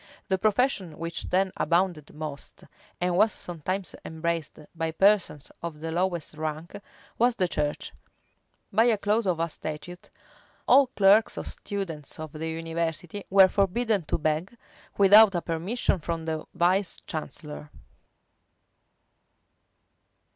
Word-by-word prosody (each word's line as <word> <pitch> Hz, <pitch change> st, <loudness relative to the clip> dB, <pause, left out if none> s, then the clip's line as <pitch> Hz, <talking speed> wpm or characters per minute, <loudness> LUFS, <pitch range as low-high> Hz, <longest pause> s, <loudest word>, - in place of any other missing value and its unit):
The 190 Hz, -1 st, +1 dB
profession 210 Hz, -, +1 dB
which 165 Hz, +1 st, -5 dB
then 190 Hz, +1 st, +2 dB
abounded 170 Hz, -3 st, 0 dB
most, 150 Hz, -2 st, -7 dB, 0.4 s
and 180 Hz, 0 st, 0 dB
was 215 Hz, +4 st, +4 dB
sometimes 180 Hz, +1 st, -4 dB
embraced 160 Hz, -1 st, -3 dB, 0.2 s
by 165 Hz, -1 st, -2 dB
persons 190 Hz, -3 st, +2 dB
of 165 Hz, -3 st, -6 dB
the 160 Hz, +1 st, -4 dB
lowest 175 Hz, -2 st, -1 dB
rank, 155 Hz, +4 st, -5 dB, 0.4 s
was 240 Hz, +1 st, +3 dB
the 185 Hz, -5 st, +1 dB
church: 150 Hz, -3 st, -2 dB, 0.8 s
by 225 Hz, +4 st, +5 dB
a 230 Hz, -3 st, +3 dB
clause 210 Hz, +1 st, 0 dB
of 175 Hz, -3 st, +1 dB
a 165 Hz, -, +1 dB
statute, 160 Hz, +3 st, -7 dB, 0.6 s
all 270 Hz, +1 st, +6 dB
clerks 205 Hz, -2 st, +4 dB
or -, -, -4 dB
students 170 Hz, -9 st, -6 dB
of 155 Hz, -1 st, -6 dB
the 160 Hz, +2 st, -5 dB
university 165 Hz, +3 st, -4 dB
were 195 Hz, 0 st, +7 dB
forbidden 200 Hz, +2 st, +1 dB
to -, -, -1 dB
beg, 160 Hz, +8 st, -2 dB, 0.4 s
without 200 Hz, 0 st, +7 dB
a 175 Hz, -, 0 dB
permission 180 Hz, +5 st, -1 dB
from 165 Hz, 0 st, -4 dB
the 160 Hz, -1 st, -3 dB
vice 185 Hz, +2 st, +1 dB
chancellor. 150 Hz, -1 st, -6 dB
175 Hz, 125 wpm, -27 LUFS, 160-200 Hz, 0.8 s, were